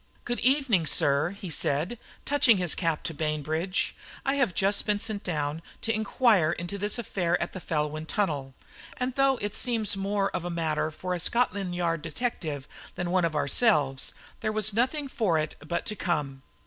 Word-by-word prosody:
"Good 240 0 -1
evening, 255 - +3
sir," 140 +3 +4
he 195 -2 -7
said, 160 +11 0 0.3
touching 285 -6 +5
his 180 -3 +3
cap 165 -4 -1
to 165 - -3
Bainbridge; 155 +4 -1 0.3
"I 270 - +2
have 270 -11 +1
just 200 +2 +2
been 210 -1 +3
sent 210 -1 -4
down 150 -2 -2 0.2
to 225 - +1
inquire 215 -6 +3
into 175 +4 -5
this 205 +3 0
affair 180 -6 0
at 170 - -3
the 185 - -5
Felwyn 155 0 -2
Tunnel, 145 -11 -1 0.4
and 250 0 -1
though 270 0 +3
it 205 0 -2
seems 225 -5 +1
more 195 0 0
of 175 - -3
a 175 - -3
matter 160 -2 -1
for 180 +3 -4
a 180 - -2
Scotland 195 -2 0
Yard 165 -2 0
detective 155 - -3 0.3
than 175 -1 -2
one 185 -2 +3
of 160 -2 -2
ourselves, 145 - +2 0.2
there 215 - -1
was 215 -1 +3
nothing 260 +6 +1
for 215 -11 +1
it 155 0 -1
but 170 +2 -2
to 210 - -2
come. 150 -8 -2
180 Hz, 180 wpm, -27 LUFS, 155-215 Hz, 0.4 s, touching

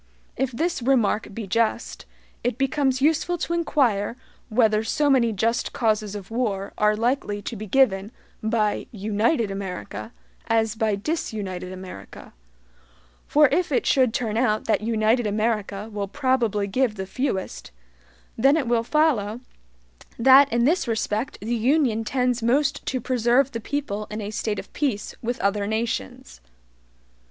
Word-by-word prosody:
If 265 0 -1
this 325 +5 -1
remark 230 -5 +1
be 220 +1 -6
just, 230 +4 -1 0.4
it 245 -1 -1
becomes 270 -1 +1
useful 325 +3 +2
to 340 - -3
inquire 250 -10 +1 0.3
whether 215 -2 +3
so 290 +6 +1
many 240 -4 +3
JUST 225 +3 -1
causes 215 -3 0
of 200 0 -8
war 210 -5 -2
are 210 0 +2
likely 230 -2 -1
to 230 - -5
be 215 0 -7
given 205 -4 +2 0.3
by 220 -1 0
UNITED 215 +2 0
AMERICA 180 - -6 0.4
as 225 -1 +2
by 220 -2 0
DISUNITED 200 - -4
America; 185 - -10 0.9
for 300 0 +5
if 325 +4 0
it 260 - +1
should 260 -4 +3
turn 220 -2 -2
out 215 -3 +1
that 220 - +1
United 220 +1 +1
America 210 -1 -1
will 200 -1 -3
probably 240 -4 0
give 220 +2 0
the 190 -2 -4
fewest, 195 -2 -3 0.7
then 275 +6 +4
it 280 -6 -1
will 235 -1 +2
follow 240 -7 +1 0.8
that 265 +3 +7
in 235 +1 +2
this 330 +1 +2
respect 220 +1 -2
the 225 +4 -2
Union 240 -1 +2
tends 250 0 0
most 275 +5 +1
to 260 - -1
preserve 250 +2 +2
the 230 - -4
people 215 -6 -3
in 210 +1 -5
a 205 0 -5
state 215 -1 -2
of - - -8
peace 245 -8 -2
with 240 +1 -3
other 200 +1 0
nations. 210 - -3
225 Hz, 145 wpm, -24 LUFS, 210-260 Hz, 0.9 s, that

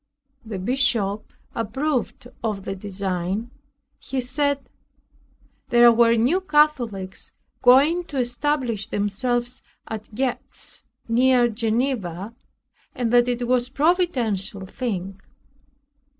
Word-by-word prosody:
The 220 -3 -5
bishop 215 -2 0 0.2
approved 255 +3 -2 0.2
of 210 -4 -2
the 195 - -3
design. 195 +2 -3 0.5
He 270 - -4
said, 275 +1 0 1.0
"there 240 0 +7
were 230 0 +5
New 260 +12 +2
Catholics 265 - +1 0.3
going 285 +8 +5
to 295 -4 -6
establish 245 -3 -1
themselves 240 +4 -1 0.3
at 215 -1 -7
Gex, 255 0 -4 0.3
near 245 +1 +4
Geneva, 225 -4 -2 0.6
and 240 -2 -1
that 240 0 +5
it 245 -1 -1
was 250 0 +2
a - - -20
providential 250 - +1
thing." 195 -3 -4
240 Hz, 100 wpm, -23 LUFS, 205-260 Hz, 1.0 s, there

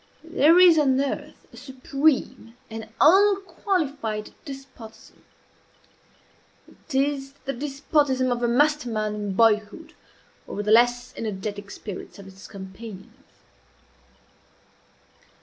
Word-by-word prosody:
If 325 - -15
there 315 +5 +5
is 350 -3 +7
on 265 -3 +2
earth 285 +2 -4
a - - -13
supreme 265 -1 -1 0.2
and 220 0 -7
unqualified 340 - +2
despotism, 265 -6 -12 1.6
it 305 - -6
is 275 0 0
the 275 - -2
despotism 275 -1 0
of 240 0 -1
a 240 - +1
master 295 +2 +2
mind 215 -1 -2
in 205 -2 -4
boyhood 225 - +1 0.5
over 205 - -4
the 210 - -1
less 245 +2 +3
energetic 205 -1 -5
spirits 200 -1 -9
of 200 - -12
its 195 0 -13
companions. 195 +3 -10
255 Hz, 110 wpm, -24 LUFS, 215-290 Hz, 1.6 s, is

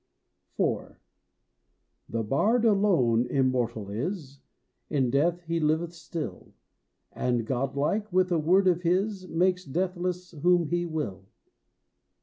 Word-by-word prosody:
IV. - - -1 1.1
The 115 0 -2
bard 220 - +2
alone 170 - +3
immortal 120 -5 0
is; 140 - -4 0.5
In 130 -5 +1
death 165 +6 +2
he 165 0 -1
liveth 160 +2 0
still, 165 -1 -7 0.6
And, 120 -2 -1
godlike, 140 - -1
with 185 0 +2
a 170 - +3
word 185 +5 +3
of 175 -1 +3
his 185 +2 0
Makes 180 +2 +1
deathless 180 +3 -2
whom 175 0 +2
he 175 0 0
will. 125 - -4
165 Hz, 115 wpm, -27 LUFS, 135-180 Hz, 1.1 s, alone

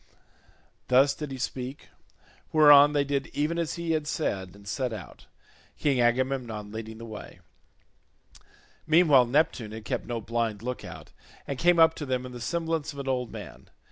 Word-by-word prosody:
Thus 135 +3 +5
did 150 -2 -6
he 135 - -6
speak; 130 +1 -5 0.6
whereon 145 -1 +7
they 145 -1 +2
did 140 -1 -2
even 155 +4 0
as 165 -2 -2
he 170 -1 -3
had 155 -2 -1
said 95 - -3
and 100 0 -16
set 125 +3 -2
out, 105 -7 -10 0.5
King 135 -4 +1
Agamemnon 120 -4 0
leading 110 0 -7
the 115 - -9
way. 110 -2 -10 1.5
Meanwhile 155 -6 +5
Neptune 120 -5 0
had 110 0 -8
kept - - -3
no 120 -1 -3
blind 115 -1 -2
look 125 +1 -4
out, - - -10 0.3
and 140 -2 -5
came 175 +2 +4
up 160 -1 +6
to 150 - -7
them 130 -1 -1
in 125 - -8
the 120 -1 -9
semblance 165 +1 -2
of - - -13
an 140 -1 -6
old 125 -2 -1
man. - - -10
130 Hz, 170 wpm, -27 LUFS, 115-150 Hz, 1.5 s, whereon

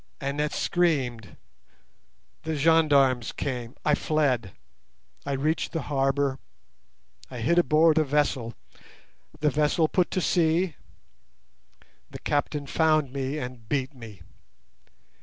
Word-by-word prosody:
Annette 145 +2 -2
screamed. 130 - -1 1.0
The 160 0 -3
gendarmes 140 -6 +3
came. 125 -3 -5
I 150 - +3
fled. 135 - 0 0.7
I 140 - -1
reached 155 +4 -1
the 165 -4 -2
harbour. 135 -1 0 0.9
I 125 - -8
hid 170 +10 +2
aboard 160 -1 +4
a - - +3
vessel. 135 -5 0 0.9
The 150 -1 +3
vessel 150 +3 +2
put 180 +2 +1
to - - -1
sea. 170 -1 +1 1.3
The - - -8
captain 145 0 -2
found 155 -2 +1
me 135 +1 -3
and 125 -5 -7
beat 135 -1 -1
me. 110 -8 -12
145 Hz, 110 wpm, -26 LUFS, 130-155 Hz, 1.3 s, aboard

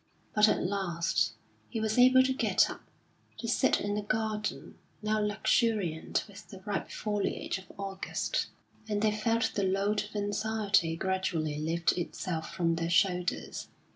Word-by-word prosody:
But 210 0 +6
at - - +1
last 180 -3 0 0.4
he 230 - -3
was 220 +2 0
able 255 +1 +7
to 265 0 +1
get 260 - +3
up, - - -9 0.6
to - - -5
sit - - +3
in 205 0 -2
the 210 - -1
garden, 215 0 -2 0.2
now 215 0 +1
luxuriant 210 -5 +1
with 200 -1 -13
the 190 - -10
ripe 205 -1 -3
foliage 205 -2 -2
of 190 - -14
August; 195 - -2 0.4
and 210 0 0
they 215 - +4
felt 230 +2 +1
the 205 - 0
load 200 +2 +1
of 215 - -17
anxiety 205 -4 +1
gradually 170 -5 -1
lift 165 +2 +1
itself 170 -1 -4
from 165 -2 0
their 165 0 -1
shoulders. 180 0 +1
200 Hz, 150 wpm, -30 LUFS, 180-215 Hz, 0.6 s, able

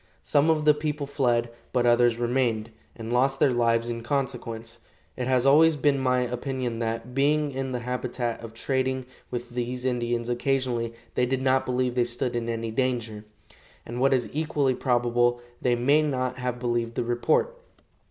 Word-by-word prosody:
Some 145 +2 +3
of 155 -1 +2
the 150 - +7
people 150 -1 -3
fled, 120 -4 0 0.2
but 125 -2 +1
others 120 -1 +4
remained, 120 -2 0 0.2
and 115 0 -5
lost 135 +2 +2
their 135 - +4
lives 115 -1 +2
in 115 -1 -3
consequence. 120 -3 -3 0.4
It 125 - -3
has 130 -1 +2
always 155 +3 +6
been 145 -1 +2
my 125 -1 +2
opinion 125 -1 -3
that, 115 +2 -3
being 145 +2 +2
in 135 0 -3
the 125 -1 -3
habit 125 +1 -4
of 115 -1 -3
trading 130 +1 -1 0.2
with 120 0 -5
these 125 +1 -3
Indians 120 -2 -1
occasionally, 120 -2 -1 0.2
they 125 - +1
did 130 +1 -1
not 130 0 +2
believe 125 0 0
they 125 -1 +2
stood 120 +1 -2
in 115 -1 -2
any 115 -1 -3
danger; 115 -3 -2 0.6
and, 120 +2 -5
what 135 - +4
is 130 -2 +2
equally 150 -3 +1
probable, 120 -1 +1 0.2
they 125 -1 +2
may 140 +6 +3
not 130 -4 -1
have 125 -1 -2
believed 120 -1 -1
the - - 0
report. 120 - +1
125 Hz, 170 wpm, -26 LUFS, 120-135 Hz, 0.6 s, the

